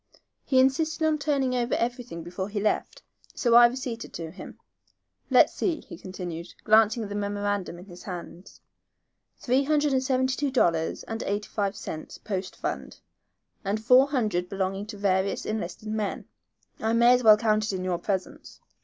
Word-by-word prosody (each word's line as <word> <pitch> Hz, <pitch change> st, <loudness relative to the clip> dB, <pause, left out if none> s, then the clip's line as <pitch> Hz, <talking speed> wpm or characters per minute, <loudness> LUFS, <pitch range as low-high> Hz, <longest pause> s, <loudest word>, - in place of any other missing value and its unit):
He 265 Hz, -, +1 dB
insisted 310 Hz, +5 st, +2 dB
on 310 Hz, -1 st, +2 dB
turning 280 Hz, -3 st, 0 dB
over 245 Hz, -1 st, 0 dB
everything 240 Hz, -8 st, -3 dB
before 180 Hz, +3 st, -5 dB
he 205 Hz, 0 st, -3 dB
left, 210 Hz, +1 st, -1 dB, 0.3 s
so 235 Hz, -2 st, +1 dB
I 240 Hz, 0 st, +9 dB
receipted 245 Hz, -2 st, -5 dB
to 165 Hz, -1 st, -6 dB
him. 185 Hz, -, -10 dB, 0.7 s
Let's -, -, +5 dB
see," 330 Hz, -5 st, -1 dB
he -, -, -11 dB
continued, 175 Hz, -2 st, -7 dB
glancing 220 Hz, +1 st, +4 dB
at 205 Hz, -, -6 dB
the -, -, -5 dB
memorandum 205 Hz, -3 st, -2 dB
in 180 Hz, -, -11 dB
his 180 Hz, -3 st, -12 dB
hand. 180 Hz, -1 st, -9 dB, 0.8 s
"Three 260 Hz, +2 st, +1 dB
hundred 295 Hz, -1 st, +2 dB
and 260 Hz, -, +2 dB
seventy 260 Hz, 0 st, +1 dB
two 290 Hz, -1 st, -1 dB
dollars 170 Hz, -11 st, +1 dB
and 225 Hz, 0 st, -5 dB
eighty 205 Hz, +1 st, -3 dB
five 200 Hz, -1 st, -1 dB
cents 155 Hz, -4 st, -7 dB
post 195 Hz, -3 st, -4 dB
fund, -, -, -5 dB, 0.6 s
and 200 Hz, +2 st, -1 dB
four 250 Hz, +5 st, +6 dB
hundred 210 Hz, -11 st, -1 dB
belonging 195 Hz, +1 st, -2 dB
to 215 Hz, -1 st, -8 dB
various 195 Hz, -1 st, 0 dB
enlisted 215 Hz, 0 st, -4 dB
men. 215 Hz, -1 st, -3 dB, 0.5 s
I 220 Hz, +1 st, 0 dB
may 235 Hz, +1 st, +6 dB
as 250 Hz, -, +3 dB
well 215 Hz, -1 st, +8 dB
count 215 Hz, -1 st, +1 dB
it 210 Hz, -, -2 dB
in 185 Hz, -1 st, -3 dB
your 180 Hz, -2 st, -1 dB
presence." 190 Hz, 0 st, -4 dB
215 Hz, 170 wpm, -26 LUFS, 190-250 Hz, 0.8 s, I